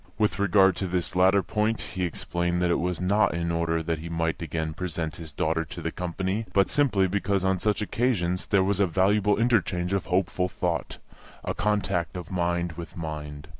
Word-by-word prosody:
With 105 -2 +1
regard 95 -2 +4
to 95 - -2
this 90 0 -2
latter 95 +2 +4
point 110 +1 0
he 90 -1 -3
explained 85 +1 -2
that 90 - +2
it - - +2
was 90 0 -1
not 100 +1 +2
in 85 0 -1
order 85 -1 0
that 80 -1 -2
he 85 +2 -7
might 80 0 -1
again 80 0 -3
present 85 -2 -4
his 80 -2 -8
daughter 80 +2 0
to - - -9
the - - -3
company, 95 +5 -3
but 100 -1 +3
simply 135 -10 +3
because 100 0 0
on 95 -1 +1
such 105 +1 0
occasions 100 -6 0
there 100 -2 +3
was 100 0 0
a 100 - +4
valuable 100 +3 +2
interchange 100 -6 +1
of 100 - 0
hopeful 90 0 0
thought, 90 -2 -2 0.5
a - - -2
contact 95 -6 -1
of 90 0 -7
mind 85 -1 0
with 85 +1 -9
mind. 75 -3 -6
90 Hz, 195 wpm, -26 LUFS, 85-100 Hz, 0.5 s, regard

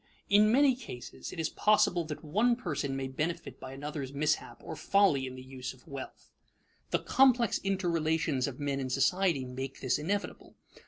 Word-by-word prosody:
In 210 +1 +6
many 270 +1 +5
cases 180 - -8
it 175 - -8
is 160 - 0
possible 210 -4 +3
that 155 +1 -6
one 215 +10 +3
person 145 - -3
may 135 0 -2
benefit 155 +6 -3
by 130 - -8
another's 140 0 -5
mishap 150 +2 -1
or - - -6
folly 190 -10 +3
in 130 - -7
the 130 - -9
use 130 -1 -6
of 130 - -21
wealth. 140 -3 -9 0.6
The - - +2
complex 250 -4 +3
interrelations 165 -7 0
of 140 -1 -6
men 140 -1 -1
in 130 -1 -3
society 140 +2 +2
make 130 +2 -6
this 130 +1 0
inevitable. 200 +7 -3
150 Hz, 170 wpm, -31 LUFS, 135-195 Hz, 0.6 s, In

